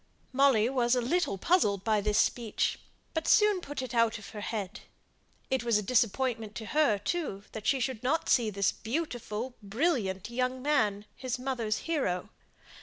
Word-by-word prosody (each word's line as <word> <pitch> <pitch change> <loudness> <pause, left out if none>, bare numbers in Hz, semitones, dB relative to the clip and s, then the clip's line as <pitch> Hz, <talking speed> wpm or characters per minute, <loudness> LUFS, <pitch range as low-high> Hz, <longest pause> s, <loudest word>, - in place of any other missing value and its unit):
Molly 260 -5 +4
was 250 -1 +2
a - - +2
little 250 - 0
puzzled 200 - +2
by 215 -1 +2
this 210 0 +1
speech, 230 -3 +1 0.3
but 320 -1 -2
soon 420 -4 +5
put 290 -4 -5
it 255 - -6
out 230 -1 +3
of 210 - -11
her 210 - -7
head. 210 -1 -4 0.7
It 265 -1 +1
was 235 -3 +3
a 210 - -1
disappointment 230 0 0
to 225 - -5
her, 295 -6 +2
too, 205 - -3
that 215 -1 -6
she 270 - +3
should 250 -3 -2
not 295 +6 0
see 235 -4 +3
this 200 -1 +1
beautiful, 240 -3 -4
brilliant 210 - -1
young 255 +1 -1
man, 215 -9 +1
his 255 -2 -3
mother's 250 -4 -2
hero. 215 - -1
235 Hz, 170 wpm, -30 LUFS, 210-270 Hz, 0.7 s, soon